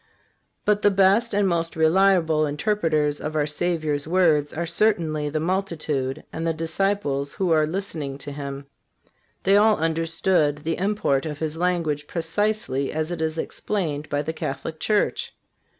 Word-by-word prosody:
But 210 0 +2
the 205 - +5
best 200 +4 +3
and 205 0 +2
the - - +2
most 165 -1 -1
reliable 160 -2 +3
interpreters 150 -2 0
of 155 +1 -4
our 150 -1 +2
Savior's 155 -2 -1
words 160 -5 +3
are 170 +2 -3
certainly 160 -6 +1
the 155 +1 -1
multitude 155 -6 -2
and 165 +1 -3
the 165 - 0
disciples 160 -4 -1
who 185 -3 -1
are 155 -1 +4
listening 160 -6 -4
to 145 +1 -7
Him. 140 -1 -6 0.8
They 195 +1 +5
all 215 +1 +5
understood 165 -1 +1
the 165 +1 -2
import 185 -8 0
of 150 -2 -5
His 155 0 -3
language 165 -4 -1
precisely 165 -5 -1
as 155 +2 -2
it 170 -2 -4
is 160 0 -1
explained 160 -5 -3
by 145 0 0
the 160 +2 -3
Catholic 155 +1 -5
Church. 210 -1 0
160 Hz, 155 wpm, -24 LUFS, 150-190 Hz, 0.8 s, the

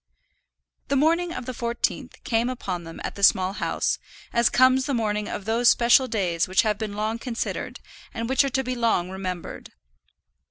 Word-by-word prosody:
The 280 - 0
morning 335 +5 +2
of 255 - -6
the 255 - -5
fourteenth 235 0 -3
came 235 0 0
upon 185 -9 -4
them 165 0 -9
at - - -4
the 200 - -10
Small 190 -1 +4
House, - - -1 0.3
as 235 0 +4
comes 255 +1 +4
the 280 - 0
morning 210 -2 -1
of 200 - -5
those 230 +2 +3
special 245 +2 +4
days 180 -8 0
which 185 -1 +3
have 210 -2 0
been 215 -2 -4
long 215 +2 -2
considered, 235 -2 -4 0.3
and 230 0 -4
which 265 +3 +3
are 275 - 0
to 265 0 -1
be 255 0 -3
long 225 -7 0
remembered. 185 -2 -6
230 Hz, 185 wpm, -24 LUFS, 200-255 Hz, 0.3 s, Small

